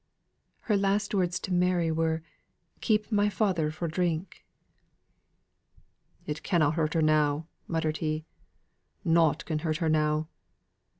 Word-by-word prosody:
"Her 215 Hz, -, +1 dB
last 200 Hz, +1 st, +1 dB
words 180 Hz, -3 st, +1 dB
to 185 Hz, -, -3 dB
Mary 175 Hz, -2 st, +2 dB
were, 160 Hz, 0 st, 0 dB, 0.6 s
'Keep 215 Hz, -1 st, +1 dB
my 205 Hz, -1 st, +3 dB
father 190 Hz, -7 st, +1 dB
fro' 155 Hz, +2 st, -4 dB
drink.'" 170 Hz, +1 st, -2 dB, 1.8 s
"It 150 Hz, 0 st, -4 dB
canna 155 Hz, -5 st, +2 dB
hurt 155 Hz, -1 st, -1 dB
her 160 Hz, -, +3 dB
now," 155 Hz, 0 st, +2 dB, 0.2 s
muttered 160 Hz, -2 st, -1 dB
he. 155 Hz, 0 st, -2 dB, 0.8 s
"Nought 165 Hz, -2 st, +3 dB
can 155 Hz, -2 st, -2 dB
hurt 155 Hz, -1 st, -1 dB
her 165 Hz, -1 st, 0 dB
now." 155 Hz, 0 st, +1 dB
165 Hz, 125 wpm, -28 LUFS, 155-180 Hz, 1.8 s, my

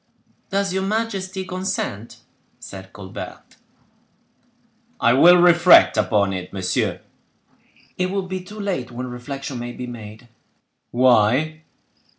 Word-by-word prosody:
"Does 195 Hz, -1 st, -1 dB
your 190 Hz, -, 0 dB
majesty 195 Hz, -2 st, -3 dB
consent?" 185 Hz, -, -4 dB, 0.4 s
said 95 Hz, -1 st, -10 dB
Colbert. 95 Hz, -2 st, -10 dB, 1.4 s
"I 120 Hz, 0 st, +4 dB
will 175 Hz, +7 st, +7 dB
reflect 175 Hz, 0 st, +6 dB
upon 100 Hz, -3 st, +1 dB
it, 90 Hz, -1 st, -6 dB
monsieur." 95 Hz, -1 st, -2 dB, 1.0 s
"It 185 Hz, 0 st, 0 dB
will 195 Hz, 0 st, -2 dB
be 185 Hz, 0 st, -5 dB
too 210 Hz, +4 st, -11 dB
late 185 Hz, -, -3 dB
when 125 Hz, +1 st, -6 dB
reflection 135 Hz, +1 st, -6 dB
may 120 Hz, 0 st, -6 dB
be 125 Hz, -, -6 dB
made." 115 Hz, -1 st, -10 dB, 0.6 s
"Why?" 130 Hz, +6 st, +3 dB
135 Hz, 115 wpm, -21 LUFS, 115-185 Hz, 1.4 s, will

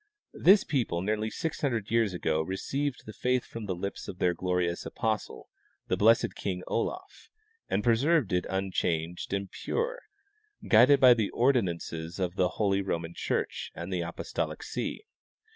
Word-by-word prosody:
This 195 Hz, +3 st, +6 dB
people 115 Hz, -, -1 dB
nearly 110 Hz, +2 st, 0 dB
600 125 Hz, -8 st, -2 dB
years 115 Hz, -3 st, +3 dB
ago 80 Hz, -3 st, 0 dB
received 130 Hz, -, -3 dB
the 110 Hz, -, -8 dB
faith 125 Hz, +2 st, 0 dB
from 115 Hz, -2 st, -7 dB
the 95 Hz, -, -1 dB
lips 100 Hz, +3 st, -5 dB
of 90 Hz, -, -7 dB
their 90 Hz, -1 st, +2 dB
glorious 90 Hz, 0 st, -1 dB
apostle, 110 Hz, -1 st, -3 dB, 0.4 s
the -, -, +2 dB
blessed 115 Hz, +2 st, +4 dB
King 90 Hz, -2 st, -4 dB
Olaf, 370 Hz, -, -4 dB, 0.4 s
and 105 Hz, -, 0 dB
preserved 120 Hz, -, +3 dB
it 90 Hz, -, +1 dB
unchanged 90 Hz, -3 st, -2 dB
and 100 Hz, -1 st, -2 dB
pure, -, -, -2 dB, 0.7 s
guided 125 Hz, +6 st, +7 dB
by 130 Hz, -2 st, +8 dB
the 110 Hz, -4 st, 0 dB
ordinances 85 Hz, -9 st, 0 dB
of 90 Hz, -2 st, -1 dB
the 90 Hz, -1 st, +2 dB
holy 100 Hz, -2 st, +2 dB
Roman 85 Hz, -3 st, -3 dB
church -, -, -2 dB
and 85 Hz, +3 st, -5 dB
the 90 Hz, -, 0 dB
apostolic 85 Hz, 0 st, -4 dB
see. -, -, -4 dB
100 Hz, 150 wpm, -29 LUFS, 90-120 Hz, 0.7 s, by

